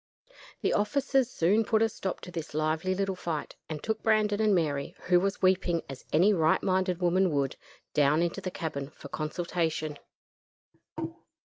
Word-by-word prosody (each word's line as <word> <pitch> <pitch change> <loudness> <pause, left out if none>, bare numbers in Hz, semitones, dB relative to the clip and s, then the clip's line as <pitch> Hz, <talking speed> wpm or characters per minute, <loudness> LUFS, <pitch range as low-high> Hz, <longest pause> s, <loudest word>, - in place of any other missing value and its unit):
The - - +1
officers 265 +3 +2
soon 205 +2 +2
put 220 0 +2
a - - +4
stop 195 -3 -4
to 180 - -9
this 165 -4 -6
lively 155 +4 0
little 195 0 -1
fight, 165 -4 -4
and 155 -2 -5
took 220 0 -1
Brandon 215 -1 +2
and 215 -2 +4
Mary, 145 -5 -1
who 180 -1 +4
was 195 +1 -2
weeping 185 -3 +2
as 135 -1 -9
any 185 +7 +5
right 160 -4 +3
minded 185 -2 +1
woman 180 +2 +3
would, 140 -3 0 0.4
down 150 +3 +4
into 175 +3 -2
the 185 - -3
cabin 140 -6 -4
for - - -12
consultation. 160 -1 -2
180 Hz, 160 wpm, -29 LUFS, 155-195 Hz, 0.4 s, any